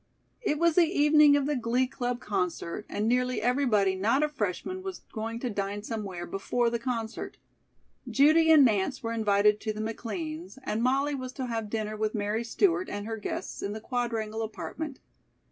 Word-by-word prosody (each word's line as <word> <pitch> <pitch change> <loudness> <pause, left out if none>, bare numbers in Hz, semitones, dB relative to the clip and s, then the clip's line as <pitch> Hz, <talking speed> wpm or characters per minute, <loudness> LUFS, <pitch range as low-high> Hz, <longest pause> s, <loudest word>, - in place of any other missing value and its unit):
It 300 -10 0
was 335 +1 +3
the 345 +1 +5
evening 295 -2 +6
of 280 - 0
the 295 +1 0
Glee 245 +1 +1
Club 245 -1 -3
concert, 180 -3 -3
and 210 +2 -1
nearly 250 +1 +1
everybody 240 -7 +2
not 225 +10 +2
a 300 - +1
freshman 290 - -3
was 380 -1 -6
going 225 0 -3
to 250 - -1
dine 200 0 -3
somewhere 200 -6 -4
before 230 +6 0
the 235 - -1
concert. 230 -2 -4 0.7
Judy 315 +3 +5
and 300 -4 +8
Nance 220 +4 +1
were 230 0 -2
invited 210 -1 +3
to 215 -1 -3
the 215 - -7
McLeans', 310 +10 -5
and 225 -3 -1
Molly 275 +4 +2
was 255 -2 -5
to 260 -2 -4
have 225 -3 -3
dinner 215 -1 -2
with 215 +1 -1
Mary 210 +2 -1
Stewart 370 - +1
and 205 0 -4
her 225 0 -4
guests 210 - -5
in 200 - -3
the 215 - -5
Quadrangle 225 -2 -2
apartment. 270 +6 -5
230 Hz, 180 wpm, -28 LUFS, 215-280 Hz, 0.7 s, and